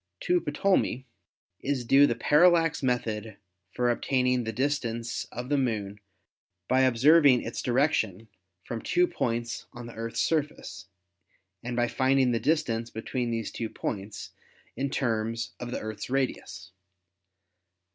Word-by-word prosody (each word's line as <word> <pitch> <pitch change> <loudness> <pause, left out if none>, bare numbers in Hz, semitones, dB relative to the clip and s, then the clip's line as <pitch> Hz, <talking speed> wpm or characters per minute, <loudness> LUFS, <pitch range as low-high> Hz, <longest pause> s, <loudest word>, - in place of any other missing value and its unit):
To 355 0 +2
Ptolemy 190 - 0 0.5
is 135 -3 -2
due 140 +4 +6
the 120 - 0
parallax 165 +5 +4
method 110 -5 -2 0.4
for 125 0 +2
obtaining 125 0 +1
the 115 - -2
distance 120 -2 -2
of 125 +2 -7
the 145 -1 +2
Moon 105 -5 -2 0.7
by 130 +1 +3
observ 130 +6 +5
ing 125 -3 +4
its 115 - -4
direction 120 - 0 0.4
from 115 - -5
two 355 0 +2
points 120 - -3
on 120 -1 -8
the 120 - -9
Earth's 115 0 -5
surface 150 - -2 0.7
and 120 0 -4
by 120 0 +2
finding 130 +1 +2
the 115 - +1
distance 115 -7 0
between 120 +2 -3
these 115 -2 -3
two 115 -2 -4
points 100 -1 -5 0.4
in 140 +3 -2
terms 115 -3 -2
of 120 - -5
the - - -3
Earth's 110 +1 -6
radius. 105 -8 -3
120 Hz, 135 wpm, -27 LUFS, 115-135 Hz, 0.7 s, due